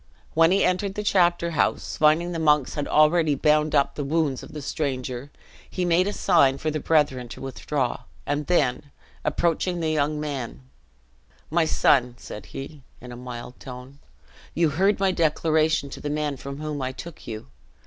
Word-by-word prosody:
When 165 +1 +5
he 195 +2 +3
entered 190 +2 0
the 210 - -3
chapter 175 -4 +2
house, 160 - 0
finding 155 +3 +3
the 165 - -3
monks 150 -4 +3
had 145 - -3
already 155 0 +4
bound 150 +2 +2
up 140 -1 +3
the 145 - -4
wounds 145 -2 0
of - - -11
the 150 - -6
stranger, 130 -2 -3 0.4
he 180 - -2
made 175 +2 +3
a - - 0
sign 135 -8 +3
for 155 +1 -2
the 155 - -2
brethren 145 -6 +1
to - - -9
withdraw: 135 -1 -2 0.3
and 145 0 -2
then, 145 -4 +1 0.3
approaching 175 +1 0
the 160 -1 0
young 150 0 0
man, 135 - -4 0.9
"My 165 0 +3
son," 125 -5 +3
said 105 -4 -9
he, 140 +2 -8 0.2
in 125 0 -10
a - - -7
mild 125 0 -8
tone, 130 +2 -10 0.6
"you 165 -2 +3
heard 195 +8 +2
my 195 -1 +3
declaration 155 -3 +1
to - - -8
the 145 - -3
men 150 -1 -1
from 140 +1 -7
whom 150 -2 -4
I 130 0 -2
took 170 +4 -10
you! 110 -11 -7
150 Hz, 180 wpm, -25 LUFS, 135-165 Hz, 0.9 s, When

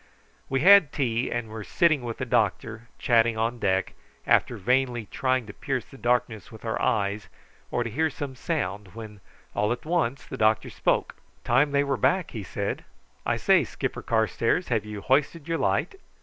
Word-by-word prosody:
We 135 0 0
had 190 -3 +7
tea, 125 -3 -1
and 120 -1 -3
were 110 -1 -6
sitting 155 - +2
with 120 -2 -5
the 130 - -3
doctor 110 0 -1
chatting 115 -1 +3
on 115 +2 -1
deck, 95 -2 0 0.3
after 120 - +3
vainly 125 +2 +1
trying 130 +2 -1
to 100 - -10
pierce 135 -1 -3
the - - -16
darkness 120 -4 0
with 110 0 -12
our 110 - -2
eyes 100 0 0 0.4
or 120 - 0
to 115 - -4
hear 160 +7 +1
some 140 -2 -6
sound, 105 - -3
when 110 -3 -9 0.3
all 105 +2 0
at 120 - -3
once 155 -6 0
the 135 - -7
doctor 110 -2 +2
spoke: - - 0 0.3
"Time 145 +2 +3
they 140 0 +2
were 140 -1 -1
back," 185 -2 +1
he 110 - -5
said. 95 - -4 0.4
"I - - +1
say, - - +4
Skipper - - -4
Carstairs, 115 +8 0
have 110 -4 0
you 105 -1 -7
hoisted 145 - +1
your 165 -1 -1
light?" - - 0
120 Hz, 180 wpm, -26 LUFS, 110-140 Hz, 0.4 s, had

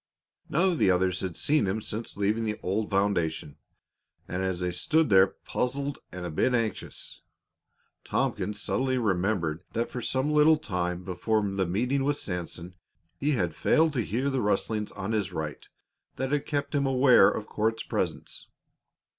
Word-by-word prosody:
None 170 +5 +3
of 170 - -1
the - - +4
others 90 0 +2
had 90 -3 -4
seen 150 -8 +2
him 95 +4 0
since 110 +1 -5
leaving 105 +3 +1
the 105 -1 -2
old 105 +4 -1
foundation, 85 -7 0 0.7
and 90 +2 -3
as 95 -2 -1
they 90 0 -1
stood 155 - +1
there, 95 0 +7
puzzled 140 +7 -3
and 90 -1 -6
a 85 - -4
bit 125 +11 +2
anxious, 115 -4 -4 0.8
Tompkins 105 +3 -1
suddenly 130 0 0
remembered 95 -6 0
that 115 +1 -1
for 125 - -4
some 130 +5 0
little 150 +1 +6
time 90 - -3
before 100 +4 0
the 95 -2 -1
meeting 125 +9 0
with 145 +1 +1
Sanson 90 -1 -5 0.5
he 145 +2 +1
had 90 - 0
failed 160 - +3
to 125 - +1
hear 125 +6 -1
the 135 -2 0
rustlings 105 +1 0
on 100 +1 -4
his 105 -4 0
right 80 -3 -5 0.5
that 130 +1 -2
had 145 -1 0
kept 145 0 -2
him 140 -2 +2
aware 130 -5 +6
of 105 - -3
Court's 110 +1 -1
presence. - - -3
105 Hz, 165 wpm, -28 LUFS, 90-130 Hz, 0.8 s, there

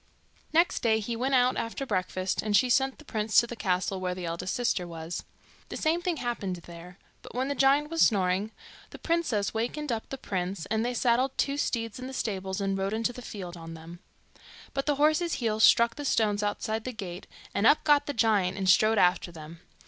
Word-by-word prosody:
Next 335 +3 +3
day, 220 -2 +2
he 230 +2 -3
went 260 +3 0
out 250 0 +3
after 230 +4 -3
breakfast, 185 -3 -1
and 210 -1 +2
she 250 -1 +2
sent 265 +2 +2
the 310 - -16
prince 215 -3 -1
to - - +7
the 240 - -7
castle 190 -2 -1
where 180 -1 -2
the 180 -1 -5
eldest 170 +5 -3
sister 235 -8 0
was. 165 0 -6 0.5
The - - -5
same 325 +2 +1
thing 350 -2 -1
happened 235 -8 -3
there; 175 +1 -11 0.2
but - - -12
when 260 +2 -1
the - - 0
giant 280 +2 +3
was 330 - 0
snoring, 195 -1 +3 0.4
the - - -10
princess 330 -12 0
wakened 245 +6 -2
up 225 -1 -3
the 270 - -5
prince, 185 -6 -3
and 220 0 +1
they 245 +1 -2
saddled 250 +3 +1
two 280 - +1
steeds 230 -5 -2
in 255 - -6
the 265 - -8
stables 190 -6 -3
and 195 -1 -1
rode 195 +1 -2
into 230 +2 -1
the 250 - -9
field 185 -6 -7
on 165 -1 -9
them. 165 +2 -11 0.7
But 275 +1 -2
the 295 - +2
horses' 310 +4 +2
heels 220 -3 0
struck 235 0 +6
the 290 - -5
stones 210 -6 +1
outside 215 +2 -2
the 255 - -5
gate, 185 -5 -7 0.3
and 210 - +3
up 305 - +5
got 295 -2 +4
the 285 - -2
giant 210 -6 +2
and 190 -1 -2
strode 215 +4 +5
after 180 -1 +3
them. 160 0 -11
220 Hz, 215 wpm, -28 LUFS, 185-260 Hz, 0.7 s, to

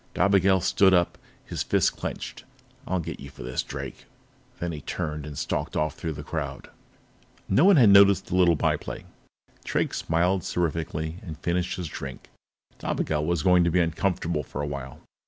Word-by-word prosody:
Dobigel 95 -1 +4
stood 95 0 +4
up, 85 -1 +2 0.3
his - - -4
fists - - +2
clenched. - - -6 0.4
"I'll 95 - 0
get 85 - -6
you 70 - -9
for 65 - -11
this, 65 +1 -2
Drake." - - -7 0.5
Then 85 0 -2
he 75 -2 -6
turned 75 -1 -4
and 75 -2 -8
stalked - - -2
off 75 0 0
through 80 -2 -4
the 75 0 -7
crowd. - - -5 0.8
No 135 - +4
one 200 0 +7
had 120 -8 +7
noticed 100 -1 +7
the - - -3
little 90 -2 +5
by - - +1
play. - - -8 0.6
Drake - - -1
smiled 90 +3 +1
seraphically 80 -1 -2
and 80 -8 -8
finished 90 +1 -1
his 90 -3 -4
drink. 70 -2 -8 0.5
Dobigel 75 -1 -1
was 85 -3 0
going 90 -1 +5
to 85 - +2
be 90 +2 +2
uncomfortable 85 -1 0
for 75 +1 -5
a - - -2
while. 70 -3 -7
85 Hz, 175 wpm, -26 LUFS, 75-95 Hz, 0.8 s, one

